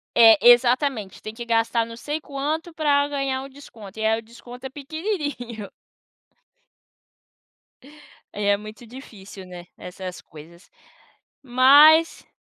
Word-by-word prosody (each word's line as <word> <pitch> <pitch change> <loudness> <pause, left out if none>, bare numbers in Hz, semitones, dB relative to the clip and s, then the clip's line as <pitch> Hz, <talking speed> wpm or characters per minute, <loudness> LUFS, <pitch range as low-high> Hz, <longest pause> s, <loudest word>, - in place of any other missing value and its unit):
é, 225 -2 +7
exatamente. 245 -4 +2
Tem 215 - -8
que 235 +1 -8
gastar 230 0 0
não 230 0 -11
sei 295 +4 -5
quanto, 305 +4 -4
pra 285 -2 +1
um - - -8
ganhar 270 -2 -3
o 275 - -10
desconto, 220 -7 -13
e 220 - -2
aí 220 +1 +1
o - - -10
desconto 240 +3 -13
é - - -5
pequenininho. 290 - -6 2.6
É, 205 0 -4
é 200 - +3
muito 215 +3 -12
difícil, 205 -6 -12
né, 180 -1 -11
essas 180 0 -9
coisas. 165 +4 -16 0.7
Mas 285 +5 +5
240 Hz, 130 wpm, -22 LUFS, 215-285 Hz, 2.6 s, é